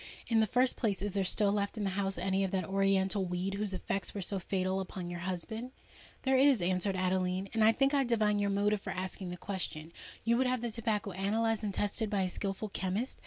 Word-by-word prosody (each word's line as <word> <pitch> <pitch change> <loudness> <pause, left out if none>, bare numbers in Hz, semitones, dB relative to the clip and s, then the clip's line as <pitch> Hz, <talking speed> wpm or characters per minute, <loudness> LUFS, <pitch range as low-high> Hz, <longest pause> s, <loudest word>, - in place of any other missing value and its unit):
"In 225 -2 +3
the 220 - +4
first 250 +3 +2
place, 200 -5 0
is 205 - -1
there 195 +1 0
still 200 +2 +3
left 200 +1 -1
in 210 - -2
the 195 - 0
house 195 -1 -1
any 190 +2 +1
of 190 - 0
that 185 -2 -1
oriental 195 +1 +2
weed 180 +2 -2
whose 205 0 -2
effects 195 +2 -2
were 200 - -2
so 195 +2 -1
fatal 185 0 -1
upon 180 -2 -5
your 175 - -5
husband?" 220 +8 -5 0.5
"There 265 0 +3
is," 270 -2 +5
answered 185 +2 +1
Adeline; 185 +1 0
"and 225 -1 +3
I 220 - +7
think 270 +5 +2
I 280 -1 +4
divine 215 -4 +2
your 200 0 +1
motive 205 +1 +1
for - - -6
asking 185 0 -4
the 180 - -5
question. 170 -4 -4 0.3
You 235 +1 +3
would 260 +1 +2
have 250 -1 0
the 240 -1 -2
tobacco 215 -3 -1
analysed 220 +4 0
and 205 - -1
tested 205 +3 -1
by 200 -2 +1
a 185 - 0
skilful 195 +3 -3
chemist? 195 +7 -2
200 Hz, 230 wpm, -32 LUFS, 190-220 Hz, 0.5 s, I